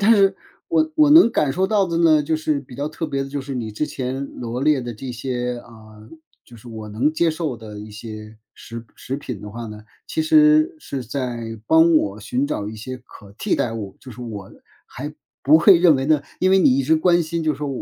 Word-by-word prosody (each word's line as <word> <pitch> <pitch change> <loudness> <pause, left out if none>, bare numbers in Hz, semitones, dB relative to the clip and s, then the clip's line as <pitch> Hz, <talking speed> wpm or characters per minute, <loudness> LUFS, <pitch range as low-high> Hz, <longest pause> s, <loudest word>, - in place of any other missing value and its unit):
但 215 +3 +6
是， 195 -2 +3 0.3
我 315 -2 +1
我 305 -2 +5
能 310 -5 +8
感 145 -3 +1
受 190 +5 +1
到 205 -1 +2
的 170 -1 -1
呢， 160 -3 +4
就 155 +2 0
是 155 -2 -1
比 130 -3 -13
较 145 +1 -2
特 155 +2 -5
别 140 -3 -2
的 - - -8
就 140 +1 -4
是， 135 +1 -7
你 110 -3 -4
之 110 - -1
前 135 -1 -4
罗 120 +1 -4
列 150 -3 +3
的 120 -1 -6
这 130 +4 -7
些 125 0 -3
嗯， 110 +3 -15 0.3
就 120 - -15
是 120 +2 -14
我 110 -2 -8
能 120 +9 0
接 170 +1 +2
受 155 -6 -3
的 105 -2 -10
一 105 - -10
些 110 0 -9 0.2
食 115 0 -9
食 135 - -5
品 125 -7 -7
的 105 - -8
话 115 +2 -7
呢， 105 0 -9 0.2
其 320 - -1
实 310 +1 +4
是 140 - -6
在 120 -2 -5
帮 160 +1 +5
我 105 -7 -1
寻 125 +6 -1
找 105 -8 -3
一 110 - -8
些 130 +4 -7
可 100 -5 -16
替 - - 0
代 115 - -1
物。 105 -4 -6
就 130 -3 -12
是 115 - -12
我 105 -5 -7 0.3
还 145 +4 -7 0.3
不 150 +3 +6
会 175 +2 +7
认 170 -5 +6
为 135 +1 -2
呢 155 -2 +3 0.2
因 185 - +2
为 190 - +5
你 130 -7 +4
一 135 - 0
直 160 - +3
关 175 +2 +3
心 165 +1 -3
就 155 - +1
是 140 - -9
说， 145 -1 -3
135 Hz, 255 characters per minute, -21 LUFS, 115-160 Hz, 0.3 s, 能